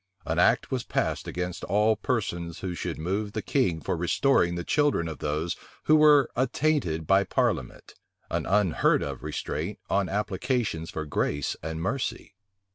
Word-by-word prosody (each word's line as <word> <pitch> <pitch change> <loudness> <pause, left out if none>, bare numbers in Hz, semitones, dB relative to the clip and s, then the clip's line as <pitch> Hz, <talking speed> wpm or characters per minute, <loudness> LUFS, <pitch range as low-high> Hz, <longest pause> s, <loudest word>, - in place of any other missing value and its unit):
[*] - - -36
An - - -1
act - - +3
was - - -1
passed - - -1
against 90 0 -4
all 105 +3 +3
persons 85 - -2
who 95 -2 -3
should 85 -1 -4
move 100 +6 -2
the 110 - -2
king 95 - +1
for 80 - -2
restoring 90 - +2
the 85 - -3
children 145 - +1
of 80 -4 -6
those 75 +3 -1 0.3
who 155 - +5
were 150 -3 +6
attainted 130 - 0
by 95 +4 +4
parliament; - - -1 0.4
an - - -1
unheard 95 -2 +3
of - - -5
restraint 75 +5 -4
on 100 -2 +1
applications 100 -3 -1
for 80 - -4
grace 75 -1 -1
and 80 +1 -4
mercy. 125 +2 -3
95 Hz, 160 wpm, -27 LUFS, 85-120 Hz, 0.4 s, were